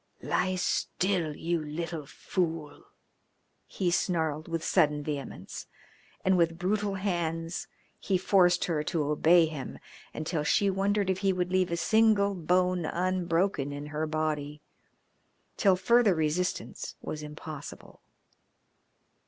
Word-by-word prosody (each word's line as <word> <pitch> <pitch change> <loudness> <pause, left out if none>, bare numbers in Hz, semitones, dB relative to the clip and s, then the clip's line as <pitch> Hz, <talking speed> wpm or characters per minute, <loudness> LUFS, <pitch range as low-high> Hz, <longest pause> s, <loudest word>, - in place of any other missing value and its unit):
"Lie 185 +1 0
still, 180 -2 0
you 170 0 -1
little 155 0 -5
fool!" 165 -2 -3 0.8
he 180 -2 -1
snarled 160 -4 0
with 165 -1 -3
sudden 150 -5 +2
vehemence, 145 -2 -6 0.6
and 190 0 +4
with 165 -1 +2
brutal 200 +3 0
hands 170 -3 -2 0.3
he 190 - +1
forced 180 -1 +3
her 160 -4 0
to 150 +1 -1
obey 160 +3 +4
him, 155 -4 -6 0.3
until 155 0 -2
she 195 +6 +3
wondered 195 0 +1
if 190 - -2
he 195 0 +2
would 180 -1 -1
leave 185 -1 +2
a 170 - 0
single 215 0 +3
bone 180 0 +1
unbroken 180 -4 0
in 145 +1 -6
her 155 +1 -1
body, 155 -1 -2 1.0
till 195 -3 +4
further 230 0 +4
resistance 160 +3 -2
was 155 - -5
impossible. 150 0 -9
170 Hz, 120 wpm, -29 LUFS, 155-185 Hz, 1.0 s, and